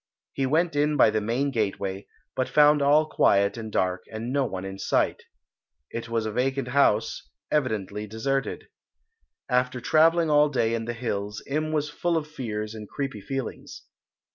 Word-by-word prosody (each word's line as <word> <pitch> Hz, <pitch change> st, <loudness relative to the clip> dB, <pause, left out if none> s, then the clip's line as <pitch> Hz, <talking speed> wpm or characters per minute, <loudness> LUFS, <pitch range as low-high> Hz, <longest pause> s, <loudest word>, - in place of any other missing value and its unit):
He 135 Hz, -1 st, 0 dB
went 160 Hz, +3 st, +1 dB
in 150 Hz, +1 st, +2 dB
by -, -, +6 dB
the 110 Hz, -, 0 dB
main 125 Hz, +6 st, 0 dB
gateway, 100 Hz, -4 st, -2 dB, 0.3 s
but 130 Hz, -, -1 dB
found 150 Hz, 0 st, +5 dB
all 145 Hz, +2 st, +5 dB
quiet 100 Hz, -9 st, +3 dB
and 110 Hz, -2 st, -6 dB
dark 90 Hz, -2 st, 0 dB
and 115 Hz, +3 st, -4 dB
no 140 Hz, -1 st, +2 dB
one 95 Hz, -5 st, -5 dB
in 95 Hz, 0 st, -7 dB
sight. -, -, +1 dB, 0.7 s
It 115 Hz, 0 st, -5 dB
was 115 Hz, -1 st, -1 dB
a 110 Hz, -, -2 dB
vacant 130 Hz, +2 st, -1 dB
house, 140 Hz, -, +1 dB, 0.2 s
evidently 105 Hz, -7 st, -1 dB
deserted. 135 Hz, +6 st, -2 dB, 0.8 s
After 125 Hz, 0 st, +1 dB
travelling 160 Hz, +4 st, +3 dB
all 150 Hz, 0 st, +5 dB
day 115 Hz, -5 st, +1 dB
in 115 Hz, -1 st, -2 dB
the 120 Hz, -, -3 dB
hills 105 Hz, -3 st, -4 dB
Im 155 Hz, +2 st, -2 dB
was 150 Hz, -1 st, 0 dB
full 165 Hz, +3 st, -1 dB
of 155 Hz, -2 st, -3 dB
fears 110 Hz, -8 st, -5 dB
and 105 Hz, -2 st, -9 dB
creepy 135 Hz, -7 st, -4 dB
feelings. 135 Hz, +1 st, -6 dB
125 Hz, 165 wpm, -26 LUFS, 110-145 Hz, 0.8 s, by